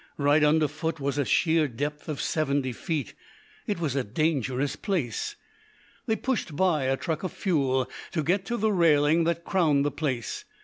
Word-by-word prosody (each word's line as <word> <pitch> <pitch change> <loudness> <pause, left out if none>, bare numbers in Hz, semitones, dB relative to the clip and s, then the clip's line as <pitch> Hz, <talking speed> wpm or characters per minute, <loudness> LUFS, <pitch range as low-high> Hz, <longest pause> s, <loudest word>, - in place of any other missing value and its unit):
Right 145 +1 +3
under 150 +1 +4
foot 160 +2 -4
was 140 +1 -1
a 140 - +1
sheer 160 0 +3
depth 145 +5 -4
of 150 - -3
seventy 140 -4 0
feet. 145 - -3 0.5
It 205 -4 -1
was 150 -5 -1
a 135 - +1
dangerous 135 +1 0
place. 160 - -2 0.7
They 220 - +2
pushed 230 - -2
by 165 -5 +2
a 135 0 +1
truck 160 0 -3
of 185 - -3
fuel 135 -8 0 0.3
to 160 -4 0
get 185 +5 +1
to 240 - -1
the 220 0 +1
railing 160 -3 +4
that 170 0 0
crowned 155 -7 +2
the 145 - +1
place. 135 -5 -3
150 Hz, 175 wpm, -27 LUFS, 140-170 Hz, 0.7 s, under